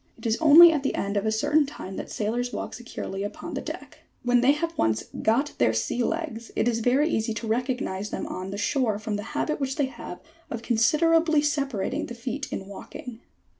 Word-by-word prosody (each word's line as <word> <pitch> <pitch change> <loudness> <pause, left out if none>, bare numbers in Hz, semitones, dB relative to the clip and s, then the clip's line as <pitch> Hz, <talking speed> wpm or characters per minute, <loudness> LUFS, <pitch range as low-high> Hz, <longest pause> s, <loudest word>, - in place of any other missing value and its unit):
It - - -13
is 225 0 +1
only 325 +2 +10
at 300 - 0
the 275 - -1
end 200 +1 -2
of 200 +2 0
a - - +2
certain 290 +7 +2
time 195 -9 -8
that - - -6
sailors 240 +4 -2
walk - - -5
securely 220 -4 -6
upon 205 - -5
the - - -3
deck. - - -8 0.2
When 245 0 +3
they 265 +3 +5
have 330 +3 -3
once 110 -1 +1
M - - -6
got 250 +7 +2
their 110 - +3
sea 235 - 0
legs 285 -7 -3
" - - -32
it - - +1
is 230 -1 +1
very 255 +6 +3
easy 220 -7 -1
to 220 - -4
recognise 225 -4 -2
them - - -4
on 185 +1 -5
shore 225 -1 +1
from 215 0 -3
the 205 - -3 0.2
habit 305 - -1
which 270 -1 -2
they 290 - +1
have 240 -8 -8 0.3
of 235 -1 -5
considerably 310 +7 +3
separating 275 -9 -1
the 240 - -7
feet 255 +4 -5
in 190 - -4
walking. 225 +4 -9
240 Hz, 215 wpm, -26 LUFS, 215-285 Hz, 0.3 s, only